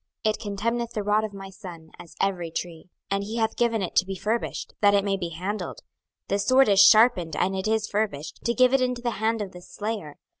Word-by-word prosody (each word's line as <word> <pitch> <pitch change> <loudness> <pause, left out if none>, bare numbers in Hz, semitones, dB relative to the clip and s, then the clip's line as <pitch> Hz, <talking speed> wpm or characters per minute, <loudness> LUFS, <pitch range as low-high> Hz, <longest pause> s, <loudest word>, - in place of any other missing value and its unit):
it 215 0 +1
contemneth 230 +3 -2
the 210 - -2
rod 210 +1 +2
of 215 - -4
my 195 -1 -9
son, 175 -5 -11
as 170 - -13
every 180 -4 -1
tree. 165 0 -6 0.3
26:021:011 - - +3
And 200 - -2
he 220 +3 -5
hath 220 -1 0
given 230 -3 +1
it 180 - -5
to 185 - +5
be 195 - -4
furbished, 220 +5 -3
that 205 -1 +5
it 200 - +3
may 200 -1 0
be 175 -3 -4
handled: 185 +6 -5 0.5
this 200 0 -1
sword 260 -1 +5
is 200 -1 +4
sharpened, 200 -7 +6
and 190 +1 0
it 190 +2 -2
is 220 0 +1
furbished, 200 -8 -3
to 235 0 +1
give 255 0 +4
it 270 - +4
into 250 -1 -1
the 240 -4 -2
hand 220 -1 +1
of 195 - -8
the 180 - -11
slayer. 205 -6 -5
205 Hz, 235 wpm, -25 LUFS, 190-225 Hz, 0.5 s, sharpened